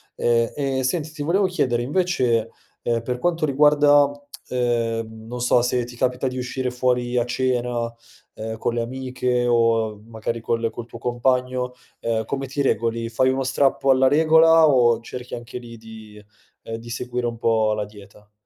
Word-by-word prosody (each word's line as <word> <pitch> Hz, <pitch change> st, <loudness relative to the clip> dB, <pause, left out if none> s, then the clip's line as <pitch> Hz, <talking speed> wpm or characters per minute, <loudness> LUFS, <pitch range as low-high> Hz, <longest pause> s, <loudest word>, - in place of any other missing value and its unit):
Ehm, 115 Hz, -1 st, +1 dB
e 135 Hz, -2 st, -1 dB
senti, 155 Hz, +4 st, -1 dB
ti 155 Hz, -1 st, -8 dB
volevo 180 Hz, +7 st, +2 dB
chiedere 130 Hz, -10 st, 0 dB
invece, 125 Hz, -7 st, 0 dB, 0.3 s
ehm, 115 Hz, -1 st, 0 dB
per 125 Hz, +1 st, -3 dB
quanto 165 Hz, +1 st, 0 dB
riguarda, 145 Hz, 0 st, +5 dB, 0.4 s
ehm, 115 Hz, -2 st, -2 dB
non 125 Hz, +1 st, -6 dB
so, 125 Hz, 0 st, +3 dB
se 125 Hz, 0 st, 0 dB
ti 120 Hz, 0 st, -10 dB
capita 125 Hz, +1 st, 0 dB
di 130 Hz, -, -6 dB
uscire 130 Hz, 0 st, -3 dB
fuori 125 Hz, 0 st, 0 dB
a 120 Hz, -, +2 dB
cena, 120 Hz, -2 st, -1 dB, 0.4 s
ehm, 110 Hz, +1 st, -5 dB
con 115 Hz, -, -1 dB
le -, -, 0 dB
amiche 125 Hz, 0 st, -2 dB
o 115 Hz, -3 st, +2 dB
magari 115 Hz, +1 st, -4 dB
col 115 Hz, 0 st, -1 dB
col 115 Hz, +1 st, -8 dB
tuo 115 Hz, -, -11 dB
compagno, 125 Hz, +1 st, -1 dB, 0.3 s
ehm, 115 Hz, -1 st, -1 dB
come 135 Hz, +4 st, -4 dB
ti 140 Hz, +2 st, -3 dB
regoli? 115 Hz, -2 st, 0 dB
Fai 130 Hz, +3 st, +2 dB
uno 135 Hz, +1 st, 0 dB
strappo 135 Hz, +1 st, +1 dB
alla 130 Hz, 0 st, +4 dB
regola 160 Hz, +2 st, +6 dB
o 120 Hz, -4 st, +4 dB
cerchi 125 Hz, +1 st, -7 dB
anche 120 Hz, +1 st, -8 dB
lì 120 Hz, -1 st, -10 dB
di, 110 Hz, -2 st, -13 dB, 0.4 s
ehm, 115 Hz, -, -6 dB
di 115 Hz, +1 st, -11 dB
seguire 125 Hz, 0 st, -3 dB
un 115 Hz, -1 st, -4 dB
po' 110 Hz, -2 st, +2 dB
la 105 Hz, 0 st, -2 dB
dieta? 105 Hz, 0 st, -15 dB
125 Hz, 170 wpm, -22 LUFS, 115-130 Hz, 0.4 s, regola